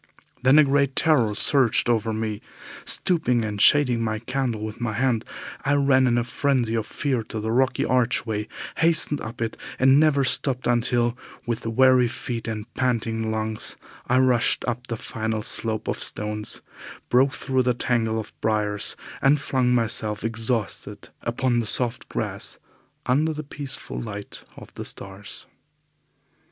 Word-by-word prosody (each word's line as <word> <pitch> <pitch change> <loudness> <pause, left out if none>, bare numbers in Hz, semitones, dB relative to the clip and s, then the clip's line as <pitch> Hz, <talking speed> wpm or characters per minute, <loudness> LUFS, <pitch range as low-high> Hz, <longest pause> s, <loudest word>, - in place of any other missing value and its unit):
Then 130 +3 +5
a 155 - +8
great 140 -1 +1
terror 125 -10 +3
surged 130 -3 +3
over 115 -1 +1
me. 110 -1 -3 0.4
Stooping 125 -10 +3
and 105 -1 -3
shading 125 -4 +5
my 110 -1 -1
candle 120 -2 -2
with 110 +2 -8
my 120 -2 -1
hand, 120 0 +1 0.4
I 140 +1 +2
ran 135 -2 +4
in 120 -1 +2
a 120 - +2
frenzy 125 -2 0
of 110 -2 -1
fear 135 -5 -1
to 110 - -5
the 110 +1 -2
rocky 130 +2 +1
archway, 115 -4 0 0.3
hastened 160 -3 +3
up 115 +1 -5
it, 115 - -4 0.2
and 135 +2 +5
never 150 -3 +3
stopped 130 0 +1
until, 120 0 +1 0.3
with 115 -1 -3
weary 130 +2 +4
feet 120 -1 -5
and 110 -1 -4
panting 115 -3 -1
lungs, 110 0 -2 0.3
I 125 - +3
rushed 130 -2 +3
up 125 +1 -3
the 115 - -3
final 110 -1 -3
slope 110 0 -3
of - - -2
stones, 105 0 -2 0.5
broke 135 +3 +3
through 130 -1 0
the 125 -1 +1
tangle 115 -2 0
of 110 - -8
briars, 105 -2 +1 0.3
and 145 +2 +4
flung 130 -2 0
myself 110 -3 +1
exhausted 115 -1 -3
upon 120 +1 0
the 115 - -2
soft 125 +2 +1
grass - - -4 0.5
under 150 +5 +2
the 155 0 -5
peaceful 140 -2 -7
light 105 -3 -8
of - - -12
the - - -6
stars. 100 +1 -7
120 Hz, 155 wpm, -24 LUFS, 110-130 Hz, 0.5 s, a